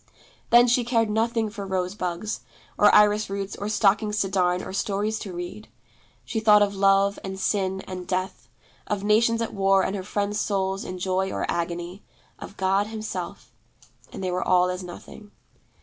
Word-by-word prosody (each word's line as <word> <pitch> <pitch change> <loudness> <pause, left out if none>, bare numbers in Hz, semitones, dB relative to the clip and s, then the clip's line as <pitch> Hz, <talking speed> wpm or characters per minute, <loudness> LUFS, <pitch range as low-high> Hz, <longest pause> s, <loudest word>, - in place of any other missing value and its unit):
Then 240 +1 +7
she 245 0 +2
cared 230 -2 +1
nothing 225 0 0
for 205 -2 -6
rose 185 -1 -2
bugs, 185 +2 -3 0.4
or 205 - +5
iris 210 0 +4
roots, 195 0 -4
or 205 - -4
stockings 210 0 +2
to 195 - -1
darn, 180 -1 +1
or - - -7
stories 210 +2 -1
to 195 - -7
read. 175 +4 -7 0.6
She 225 - -2
thought 210 -1 +6
of 200 0 -1
Love, 195 0 +3
and 190 0 -6
Sin, 190 -1 0
and 185 -1 -8
Death; 185 +1 -3 0.4
of 205 -1 -2
nations 230 +2 +3
at - - -5
war 195 -1 +3
and 190 - -2
her 195 - -3
friends' 205 +2 -2
souls 195 -2 -1
in 185 - -6
joy 190 +1 -1
or - - -2
agony, 175 +2 -3 0.4
of 200 - -10
God 195 +2 +1
Himself, 220 0 -6 0.6
and - - -7
they 185 - -1
were 180 +1 -1
all 180 0 +3
as 180 +1 -5
nothing. 185 +3 -11
195 Hz, 180 wpm, -25 LUFS, 185-210 Hz, 0.6 s, Then